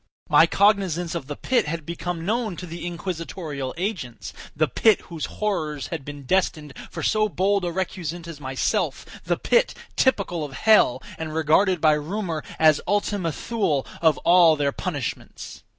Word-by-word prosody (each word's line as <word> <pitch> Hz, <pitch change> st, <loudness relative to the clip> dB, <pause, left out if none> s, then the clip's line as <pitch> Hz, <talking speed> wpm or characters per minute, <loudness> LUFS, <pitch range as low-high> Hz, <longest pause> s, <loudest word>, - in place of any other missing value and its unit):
My -, -, +6 dB
cognizance 190 Hz, -5 st, +2 dB
of 165 Hz, -6 st, -4 dB
the 145 Hz, -, -5 dB
pit 245 Hz, -, +1 dB
had 165 Hz, 0 st, -4 dB
become 170 Hz, 0 st, -4 dB
known 220 Hz, -1 st, -1 dB
to 180 Hz, -, -7 dB
the 170 Hz, +1 st, -6 dB
inquisitorial 165 Hz, -5 st, -5 dB
agents—the 160 Hz, -, -3 dB
pit, 220 Hz, -, +4 dB
whose 165 Hz, -4 st, -6 dB
horrors 155 Hz, -9 st, -3 dB
had 165 Hz, -5 st, -4 dB
been 145 Hz, 0 st, -8 dB
destined 155 Hz, -2 st, 0 dB, 0.2 s
for -, -, -6 dB
so 215 Hz, 0 st, +2 dB
bold 195 Hz, +1 st, +1 dB
a 175 Hz, -, -1 dB
recusant 175 Hz, -2 st, -4 dB
as 160 Hz, -3 st, -9 dB
myself—the 130 Hz, 0 st, -2 dB
pit, 485 Hz, +1 st, +2 dB, 0.2 s
typical 195 Hz, -, +1 dB
of 145 Hz, -2 st, -6 dB
hell, 220 Hz, +10 st, +4 dB, 0.2 s
and 160 Hz, -1 st, -5 dB
regarded 160 Hz, +4 st, +3 dB
by 155 Hz, -1 st, +5 dB
rumor 165 Hz, +1 st, -3 dB
as 155 Hz, -2 st, +5 dB
the -, -, -9 dB
Ultima 205 Hz, -4 st, 0 dB
Thule 160 Hz, -, -1 dB, 0.2 s
of 160 Hz, -3 st, +4 dB
all 170 Hz, -2 st, +6 dB
their 145 Hz, -1 st, 0 dB
punishments. -, -, -5 dB
170 Hz, 155 wpm, -24 LUFS, 155-195 Hz, 0.2 s, My